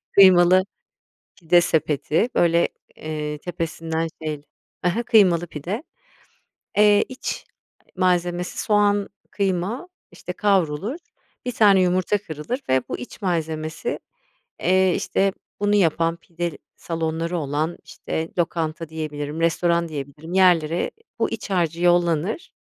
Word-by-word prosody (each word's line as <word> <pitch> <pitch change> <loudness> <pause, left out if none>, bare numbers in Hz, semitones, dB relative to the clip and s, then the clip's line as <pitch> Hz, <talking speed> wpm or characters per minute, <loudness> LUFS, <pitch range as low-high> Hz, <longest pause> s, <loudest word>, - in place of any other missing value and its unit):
Kıymalı 185 -1 +7 0.7
pide 175 0 +4
sepeti, 155 - +1
böyle, 170 0 +4 0.3
eee, 150 -1 -4
tepesinden 165 -1 -3 0.2
şeyli, 150 -2 -4 0.4
ha 180 +1 +1
ha, 235 - -1
kıymalı 185 -8 +4
pide. 175 - -5 0.9
Eee, 210 0 +6
iç 255 - -5 0.5
malzemesi, 180 -1 0
soğan, 205 -1 +2 0.2
kıyma, 200 - -1 0.2
işte, - - -7
kavrulur, 195 - +1 0.5
1 250 - -1
tane 205 -5 +5
yumurta 185 +3 +2
kırılır 195 - -5
ve 130 0 +3
bu - - -3
iç 250 - -10
malzemesi, 160 -4 -2 0.6
eee, 185 +1 +3
işte 195 0 +1 0.3
bunu 205 0 +2
yapan 165 -3 +2
pide 170 -2 -5 0.2
salonları 165 +1 -2
olan, 155 +3 -2
işte, 160 +1 -5
lokanta 165 -1 -1
diyebilirim, 155 -1 -4
restoran 170 +1 +2
diyebilirim, 150 +3 -7
yerlere 175 -3 +3 0.3
bu - - +1
iç 225 -2 -6
harcı 170 -3 0
yollanır 175 - +2
175 Hz, 115 wpm, -23 LUFS, 160-190 Hz, 0.9 s, Kıymalı